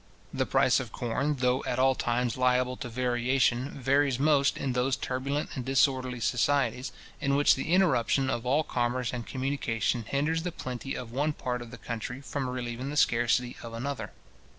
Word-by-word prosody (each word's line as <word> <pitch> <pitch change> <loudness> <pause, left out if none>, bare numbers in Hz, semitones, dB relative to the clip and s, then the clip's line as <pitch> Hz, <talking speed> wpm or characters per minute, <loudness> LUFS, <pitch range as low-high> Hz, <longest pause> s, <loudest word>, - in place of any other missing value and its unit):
The - - 0
price - - +3
of - - -6
corn, 140 +5 -1
though 125 0 +1
at - - -1
all 130 +1 +4
times 120 -1 -1
liable 125 0 +2
to 125 - -6
variation 125 +1 +1
varies 140 -1 +1
most 145 0 +3
in 130 - -2
those 125 +2 +1
turbulent 140 +3 -2
and 130 - -4
disorderly 130 -1 +1
societies, 125 +1 +1 0.3
in 140 0 +1
which 145 +1 +5
the 135 - -3
interruption 140 - +3
of 120 -3 -1
all 140 +5 +2
commerce 125 -2 -1
and 120 -2 -5
communication 130 -3 -1
hinders 150 +8 0
the 180 +1 -3
plenty 130 -2 -5
of 120 -2 -6
one 145 +5 0
part 125 -3 -3
of 120 - -8
the - - -9
country 120 +2 -5
from 140 -1 -3
relieving 125 +1 -4
the 150 - -4
scarcity 120 -1 +2
of 115 -1 -8
another. 135 +4 -4
130 Hz, 175 wpm, -29 LUFS, 120-140 Hz, 0.3 s, which